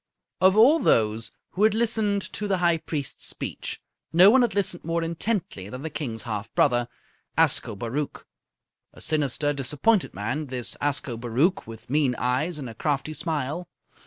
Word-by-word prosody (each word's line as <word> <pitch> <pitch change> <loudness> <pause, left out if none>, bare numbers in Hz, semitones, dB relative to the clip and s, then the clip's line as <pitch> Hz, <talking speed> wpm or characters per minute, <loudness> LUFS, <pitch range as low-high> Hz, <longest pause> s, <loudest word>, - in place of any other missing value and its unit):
Of 190 +2 +5
all 275 +9 +7
those 110 - +2 0.2
who 190 - -4
had 215 0 +5
listened 220 -3 +1
to 210 - -3
the 195 -2 +1
High 170 -2 +2
Priest's 145 -3 -4
speech, - - -4 0.3
none 195 +10 +7
had 235 -6 +1
listened 190 -3 0
more 165 +1 -1
intently 165 - -2
than 125 +5 -7
the 160 - -4
King's 115 -8 -4
half 110 -3 -4
brother, 120 -3 +3 0.5
Ascobaruch. 115 +7 0 0.7
A - - -15
sinister, 145 -1 0
disappointed 150 - +1
man, 110 +10 -3
this 125 -2 -4
Ascobaruch, 130 +5 0
with 115 -1 -10
mean 135 -2 +2
eyes 130 +8 0
and 140 -4 -6
a 115 - -7
crafty 145 +5 -2
smile. 160 +1 -3
150 Hz, 150 wpm, -25 LUFS, 125-185 Hz, 0.7 s, all